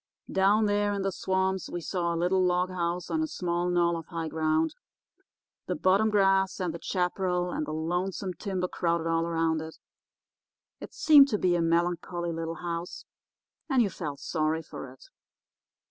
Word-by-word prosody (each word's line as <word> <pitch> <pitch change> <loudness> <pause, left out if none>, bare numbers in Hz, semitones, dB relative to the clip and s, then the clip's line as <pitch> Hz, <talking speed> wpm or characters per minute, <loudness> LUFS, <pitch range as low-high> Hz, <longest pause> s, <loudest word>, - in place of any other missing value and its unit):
Down 200 +3 +3
there 205 0 +1
in 200 -1 -2
the 195 - 0
swamps 190 0 -1
we 175 - -4
saw 170 0 -2
a 170 - -1
little 180 +2 +2
log 180 0 +1
house 175 0 -2
on 320 - +1
a 315 - 0
small 175 - -2
knoll 170 -1 +2
of 165 -2 -6
high 165 -2 -4
ground. 160 0 +1 0.9
The - - -1
bottom 190 +7 +3
grass 195 -2 +2
and 180 -3 -2
the 170 - -6
chaparral 180 -1 -1
and 155 - -3
the - - -4
lonesome 180 +4 -2
timber 185 +1 -3
crowded 170 -2 -1
all 165 0 +1
around 165 -1 0
it. 160 0 -8 1.0
It - - -10
seemed 290 -3 +7
to 215 - 0
be 180 -3 +2
a 170 - +1
melancholy 175 +1 0
little 165 0 -4
house, 170 0 -5 0.6
and 260 -4 +4
you 200 - -1
felt 150 -5 -5
sorry 160 0 -1
for 135 -4 -9
it. 130 - -17
175 Hz, 175 wpm, -28 LUFS, 165-190 Hz, 1.0 s, seemed